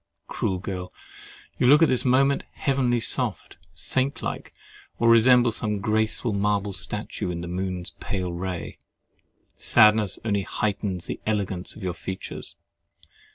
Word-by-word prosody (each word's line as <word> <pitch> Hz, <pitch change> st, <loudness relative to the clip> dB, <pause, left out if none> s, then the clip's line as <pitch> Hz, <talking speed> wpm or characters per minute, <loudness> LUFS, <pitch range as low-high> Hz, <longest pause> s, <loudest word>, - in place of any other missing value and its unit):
Cruel 95 Hz, -, -2 dB
girl! 90 Hz, -1 st, -5 dB, 0.7 s
you 125 Hz, -, +3 dB
look 150 Hz, +5 st, +7 dB
at -, -, +6 dB
this 130 Hz, -, +2 dB
moment 135 Hz, +2 st, +3 dB
heavenly 130 Hz, -4 st, +1 dB
soft, 115 Hz, -, -1 dB, 0.2 s
saint 130 Hz, +10 st, 0 dB
like, -, -, -4 dB, 0.5 s
or 115 Hz, -, +2 dB
resemble 120 Hz, +1 st, +6 dB
some 105 Hz, -1 st, -1 dB
graceful 110 Hz, +1 st, 0 dB
marble 100 Hz, 0 st, 0 dB
statue, 95 Hz, -1 st, -4 dB
in 85 Hz, -1 st, -4 dB
the 85 Hz, -, -6 dB
moon's 90 Hz, 0 st, -3 dB
pale 90 Hz, -3 st, -3 dB
ray! 90 Hz, 0 st, -5 dB, 0.8 s
Sadness 105 Hz, -3 st, +5 dB
only 100 Hz, -2 st, +1 dB
heightens 100 Hz, -2 st, -2 dB
the -, -, -5 dB
elegance 100 Hz, -4 st, -2 dB
of 110 Hz, -, -10 dB
your 90 Hz, -2 st, -2 dB
features. 95 Hz, +2 st, -6 dB
105 Hz, 135 wpm, -25 LUFS, 95-120 Hz, 0.8 s, look